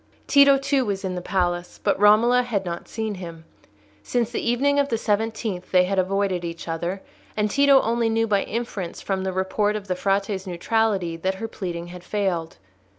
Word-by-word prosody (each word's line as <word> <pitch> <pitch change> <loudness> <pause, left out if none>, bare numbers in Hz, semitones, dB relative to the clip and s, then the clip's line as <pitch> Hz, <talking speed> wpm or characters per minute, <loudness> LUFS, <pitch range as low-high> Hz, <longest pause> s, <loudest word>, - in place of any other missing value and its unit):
Tito, 280 -1 +6
too, 275 0 +1
was 200 -3 -3
in 185 - -2
the 180 - -4
palace; 175 -1 -2
but - - +1
Romola 220 +4 +5
had 220 -6 -2
not 170 -1 -5
seen 220 -1 -3
him. 170 -4 -9 0.6
Since 235 - -1
the - - -2
evening 275 +4 +2
of 280 0 +1
the 230 - 0
seventeenth 215 -3 -2
they 180 -1 +5
had 190 +1 0
avoided 190 -1 0
each 170 0 -6
other, 170 +4 -3 0.3
and 210 -1 +1
Tito 280 +1 +5
only 230 0 +1
knew 225 0 +1
by 205 -3 +2
inference 210 -6 -4
from 190 -1 -2
the 190 - -1
report 190 +3 0
of 210 -2 -5
the 185 - -1
Frate's 195 +1 -1
neutrality 185 -1 0
that 190 +3 -1
her 225 +4 -5
pleading 175 -5 -5
had 180 0 -10
failed. 180 -5 -2
200 Hz, 190 wpm, -23 LUFS, 180-225 Hz, 0.6 s, Tito